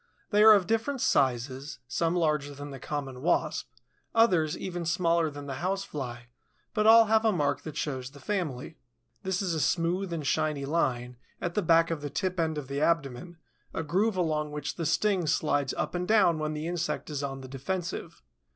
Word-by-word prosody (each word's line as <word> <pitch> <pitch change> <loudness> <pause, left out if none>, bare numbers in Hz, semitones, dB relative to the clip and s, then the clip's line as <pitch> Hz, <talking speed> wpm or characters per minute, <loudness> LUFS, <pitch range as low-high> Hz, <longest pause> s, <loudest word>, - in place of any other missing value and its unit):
They 210 0 +4
are 220 0 +10
of 195 -3 +2
different 225 +7 0
sizes, 130 - 0
some 165 +8 0
larger 150 -4 0
than 145 +1 -8
the 135 - -8
Common 135 -2 -5
Wasp, 155 -4 0 0.5
others 180 -9 +3
even 175 -2 -4
smaller 170 -1 +2
than 145 -1 -8
the 135 -1 -5
House 195 +2 -1
fly, 120 -4 -6 0.4
but 215 0 +2
all 225 0 +9
have 220 +1 +3
a 220 - +4
mark 145 -6 0
that 155 - -8
shows 130 -4 -3
the 140 +1 -15
family. 160 -4 -3 0.4
This 190 0 -1
is 180 -3 -1
a 160 - -1
smooth 175 +4 0
and 160 -3 -3
shiny 150 -1 0
line, 125 -5 -1 0.2
at 170 - -3
the 210 - +1
back 165 -1 +4
of 160 -3 -2
the 145 - -4
tip 185 +3 -2
end 160 -2 0
of 145 -3 -5
the 140 +1 -3
abdomen, 165 0 0 0.4
a 165 - -1
groove 190 +6 +1
along 155 -3 0
which 150 0 -4
the 165 -3 -2
sting 185 +1 +1
slides 145 -3 +1
up - - -2
and 180 0 -2
down 195 -7 +4
when 155 0 -2
the 155 +1 -4
insect 175 -2 -3
is 145 -1 -3
on 135 -1 -4
the 130 - -9
defensive. 165 +7 -5
160 Hz, 195 wpm, -28 LUFS, 140-180 Hz, 0.5 s, are